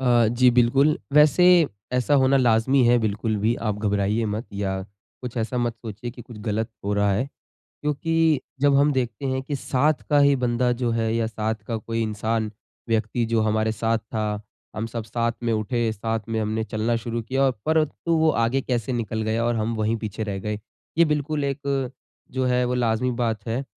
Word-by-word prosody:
अ, 120 -3 +4
जी 125 +2 +4
बिल्कुल 135 +5 +4
वैसे 150 +4 +5 0.5
ऐसा 125 +3 +2
होना 130 +1 +4
लाज़मी 125 +1 +3
है। 120 +1 +5
बिल्कुल 110 0 -1
भी 115 +2 +3 0.2
आप 105 - -4
घबराइए 105 +1 0
मत 110 +4 -4
या 95 -1 -2 0.4
कुछ 125 -1 -6
ऐसा 115 +2 -1
मत 120 -1 0
सोचिए 115 +1 -7
कि 120 0 -11
कुछ 115 -2 -12
गलत 110 +1 -1 0.2
हो 100 - 0
रहा 100 0 +2
है, 105 +7 +1 0.6
क्योंकि 155 +1 +1 0.2
जब 140 -1 +4
हम 145 +1 +4
देखते 125 0 -2
हैं 130 0 -1
कि 140 +1 -3
साथ 140 +3 +1
का 145 - +5
ही 140 0 +5
बंदा 125 0 +1
जो 120 - +2
है 110 0 0
या 115 -1 +1
साथ 110 0 -2
का 115 - -2
कोई 115 +1 -3
इंसान, 110 0 -1 0.4
व्यक्ति, 115 +1 0
जो 115 0 +1
हमारे 110 0 +1
साथ 115 +1 0
था, 110 -1 -3 0.3
हम 110 +1 -2
सब 115 -1 -5
साथ 115 +2 -1
में 115 - +1
उठे, 110 +1 0
साथ 110 +1 -2
में 110 -1 -1
हमने 110 +1 -1
चलना 115 +1 -1
शुरू 115 0 -3
किया 130 +4 -1
और 135 - +4 0.2
परंतु 160 +1 +1
वो 160 0 +4
आगे 130 +4 +1
कैसे 125 -2 -2
निकल 110 -2 -2
गया 110 +2 0
और 120 - +1
हम 110 +1 -1
वही 110 +1 0
पीछे 110 0 -5
रह 100 -2 -3
गए। 105 +2 -3 0.4
ये 170 - +7
बिल्कुल 150 -1 -1
एक 140 -2 -2 0.4
जो 130 0 0
है, 125 0 +2
वो 125 0 -1
लाज़िमी 120 0 +1
बात 115 -4 -2
है। 120 +4 -1
115 Hz, 200 wpm, -24 LUFS, 110-130 Hz, 0.6 s, ये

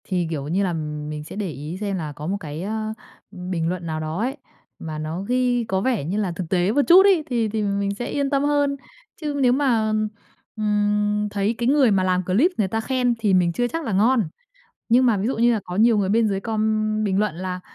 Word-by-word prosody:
Thì, 180 -3 -1
kiểu 145 -4 -4
như 185 +6 0
là, 180 -3 0 0.4
mình 150 0 -5
sẽ 150 - -10
để 205 -3 -3
ý 150 +3 -6
xem 200 -2 -2
là 155 -4 -4
có 150 +2 -7
một 195 +3 -1
cái, 155 -3 -6
ờ, 215 +1 -3 0.4
bình 180 -3 -3
luận 180 -1 -4
nào 155 -1 -3
đó 155 +3 -4
ấy, 260 +6 -2 0.4
mà 155 -1 -6
nó 155 +4 -4
ghi 245 +2 +1
có 190 -3 -1
vẻ 245 - 0
như 175 +8 -2
là 200 -4 0
thực 170 -2 -5
tế 180 +1 +2
một 285 +5 +3
chút 370 +3 +8
ấy 375 -6 +4
thì 230 -3 0
thì 220 +1 -2
mình 200 0 -1
sẽ 240 - -4
yên 280 -1 -1
tâm 275 -1 +1
hơn. 290 -1 +1 0.5
Chứ 300 -2 -2
nếu 250 -2 +4
mà, 235 -6 +1 0.6
ừm, 210 0 +1
thấy 205 +3 0
cái 235 - -1
người 270 -4 +4
mà 190 -2 +2
làm 185 0 +1
clip 230 - +3
người 210 - +1
ta 225 +4 -2
khen 250 0 +1
thì 210 -4 +1
mình 175 -2 +3
chưa 245 +7 0
chắc 330 +6 -4
là 225 - -2
ngon, 220 +1 +3 0.6
nhưng 250 +3 +5
mà 230 -4 +3
ví 195 +3 -1
dụ 260 - -2
như 240 +1 +4
là 220 - 0
có 180 - -7
nhiều 225 +2 +4
người 195 -2 +1
bên 225 +2 +3
dưới 195 -2 -1
com 215 0 0
bình 195 -2 +1
luận 210 -5 0
là, 185 +1 -4
210 Hz, 245 wpm, -22 LUFS, 185-240 Hz, 0.6 s, chút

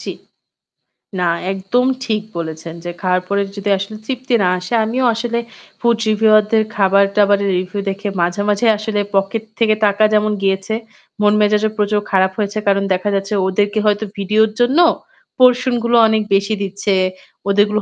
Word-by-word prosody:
জি। - - -6 1.1
না, 180 - 0 0.3
একদম 195 +6 0 0.2
ঠিক 215 -1 -1 0.2
বলেছেন 160 0 -6
যে 175 - -3
খাওয়ার 185 -1 +1
পরে 200 +1 0
যদি 200 0 -3
আসলে 200 +3 -6
তৃপ্তি 255 +1 -4
না - - +2
আসে 180 +5 -7
আমিও 250 +4 -1
আসলে 235 +1 -2 0.4
food 235 -1 +2
reviewer 215 0 +4
দের 220 -1 +3
খাবার-দাবারের 200 0 +2
review 185 +2 -4
দেখে 200 +2 -4
মাঝেমাঝেই 205 +5 +1
আসলে 215 0 -3
pocket 195 +3 0 0.2
থেকে 215 -2 +3
টাকা 205 +1 +2
যেমন 215 0 +2
গিয়েছে, 195 +2 -1 0.5
মন-মেজাজও 210 +1 +3
প্রচুর 210 0 +1
খারাপ 190 -1 +3
হয়েছে। 205 0 -2
কারণ 200 0 +2
দেখা 185 +3 -1
যাচ্ছে 195 +1 -2
ওদেরকে 205 +3 0
হয়তো 210 0 +1
ভিডিওর 215 +2 +2
জন্য 245 +5 +2 0.6
portion 250 0 +4
গুলো 235 0 +2
অনেক 220 0 +1
বেশি 200 +2 0
দিচ্ছে। 200 +1 -2 0.6
ওদেরগুলো 205 +1 +2
205 Hz, 150 wpm, -17 LUFS, 195-220 Hz, 1.1 s, reviewer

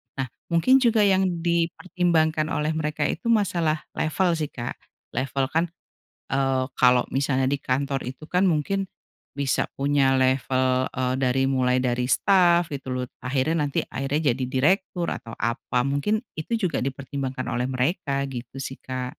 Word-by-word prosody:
Nah 135 -3 -3 0.2
mungkin 210 +11 +4
juga 230 -4 +3
yang 190 -1 +4 0.2
dipertimbangkan 170 -2 +1
oleh 150 0 -1
mereka 155 -1 -2
itu 165 - -2
masalah 175 -9 +1
level 175 +3 +1
sih, 155 -2 -2
Kak. 120 -3 -6 0.3
Level 135 +1 -1
kan, 165 +2 +2 0.6
eee, 135 -1 +1
kalau 125 0 +4
misalnya 135 -1 +1
di 140 - +1
kantor 135 +1 -1
itu 130 +5 -8
kan 180 +3 +1
mungkin, 180 +5 0 0.5
bisa 140 -2 0
punya 140 -1 +2
level, 130 0 +2
eee, 130 0 0
dari 135 0 +1
mulai 130 -1 +2
dari 125 0 0
staf 175 0 +4
gitu 135 -3 -4
loh 125 - -2 0.2
akhirnya 145 +4 0
nanti 140 - -1
akhirnya 140 +2 -1
jadi 130 +2 -1
direktur 175 +7 +1
atau 115 0 -6
apa 120 +1 -1
mungkin 145 - 0 0.2
itu 195 +9 -2
juga 185 -10 0
dipertimbangkan 135 0 -4
oleh 125 +1 -1
mereka 140 +2 -1
gitu 130 +2 -7
sih, 135 -1 -6
Kak. 130 -1 -5
140 Hz, 150 wpm, -25 LUFS, 130-165 Hz, 0.6 s, mungkin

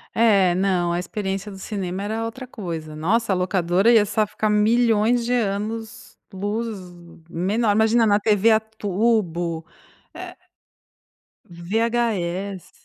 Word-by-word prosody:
É, 200 -6 +4
não, 185 -2 +1
a 170 - 0
experiência 195 +2 -4
do 195 - -10
cinema 190 -2 -4
era 220 +2 -3
outra 255 +3 -7
coisa. 165 -9 -6
Nossa, 210 +8 0
a - - +2
locadora 185 +3 +2
ia 220 -3 +5
sa 215 +1 0
ficar 215 +1 -2
milhões 225 +2 +3
de 240 +2 -1
anos 220 0 -3 0.2
luz 210 +3 -3 0.5
menor. 205 +7 0
Imagina 220 +2 +3
na 205 0 +3
TV 210 0 +3
a 220 - +5
tubo, 200 -6 -1 0.5
eh, - - -9 1.1
VHS. 200 -1 -2
205 Hz, 125 wpm, -22 LUFS, 185-225 Hz, 1.1 s, ia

